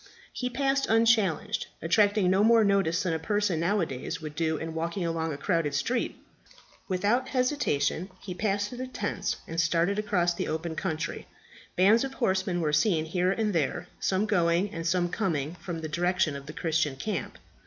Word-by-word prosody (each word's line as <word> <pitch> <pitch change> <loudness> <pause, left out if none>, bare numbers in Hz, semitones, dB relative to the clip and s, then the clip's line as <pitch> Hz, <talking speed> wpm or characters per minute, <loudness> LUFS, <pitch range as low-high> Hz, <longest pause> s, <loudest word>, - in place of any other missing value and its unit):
He 250 - -2
passed 275 +2 0
unchallenged, 220 -4 +2
attracting 200 +2 +3
no 190 +2 +4
more 225 0 +6
notice 195 -3 +2
than 180 -3 0
a 160 - -1
person 205 -1 0
now 195 +5 +1
a - - +2
days 135 +6 -5
would 155 -2 -7
do 160 0 0
in 165 +1 -5
walking 170 +3 -2
along 165 -1 -1
a 140 - -4
crowded 155 -1 0
street. 235 - -1 0.7
Without 210 +8 +1
hesitation 250 - 0
he 185 - -6
passed 205 +1 -1
through 245 - -8
the 255 - -3
tents 255 - -2
and 165 +1 0
started 170 +4 +1
across 180 -5 +1
the - - -3
open 160 +1 -3
country. 160 -2 -3 0.5
Bands 205 +6 +5
of 270 0 -5
horsemen 190 -5 0
were 150 -2 0
seen 160 0 +2
here 180 +3 +1
and 210 0 0
there, 155 -5 -1
some 195 +2 +1
going, 180 -1 +2
and 165 0 -4
some 175 0 +2
coming 165 -6 -1
from 170 -2 -5
the 160 - -3
direction 175 0 +1
of 140 0 -8
the 150 - -7
Christian 160 -4 0
camp. 165 - -4
180 Hz, 185 wpm, -28 LUFS, 160-210 Hz, 0.7 s, more